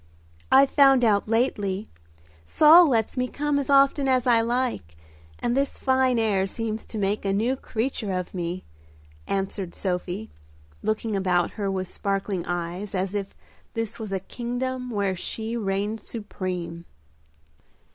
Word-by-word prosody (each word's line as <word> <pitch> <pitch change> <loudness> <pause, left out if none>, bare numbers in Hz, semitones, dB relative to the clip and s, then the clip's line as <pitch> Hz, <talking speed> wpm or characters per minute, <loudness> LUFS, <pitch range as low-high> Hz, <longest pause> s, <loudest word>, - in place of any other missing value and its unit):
"I've 270 +1 +6
found 270 -3 +6
out 205 -2 +2
lately; 210 -4 0 0.6
Saul 315 - +7
lets 225 -1 0
me 250 0 +1
come 290 +2 -1
as 280 - -4
often 275 0 +4
as 255 -2 +2
I 235 -2 +5
like, 235 - -2 0.4
and 240 - -1
this 275 +1 0
fine 260 -2 +2
air 205 -4 +1
seems 220 +1 -4
to 220 - -6
make 205 +1 0
a 195 - 0
new 225 +7 +1
creature 230 -4 -3
of 185 -1 -3
me," 180 0 -3 0.6
answered 195 -2 -3
Sophie, 180 - -3 0.5
looking 215 0 -1
about 180 -3 +1
her 200 -2 -3
with 190 -1 -2
sparkling 195 -1 -2
eyes, 175 +3 -3
as 190 +1 -1
if 200 -1 -4 0.4
this 225 -1 -3
was 215 -3 -5
a 195 - 0
kingdom 250 +4 -4
where 200 -4 0
she 220 +5 -4
reigned 205 0 -2
supreme. 180 -7 -5
215 Hz, 145 wpm, -25 LUFS, 190-250 Hz, 0.6 s, Saul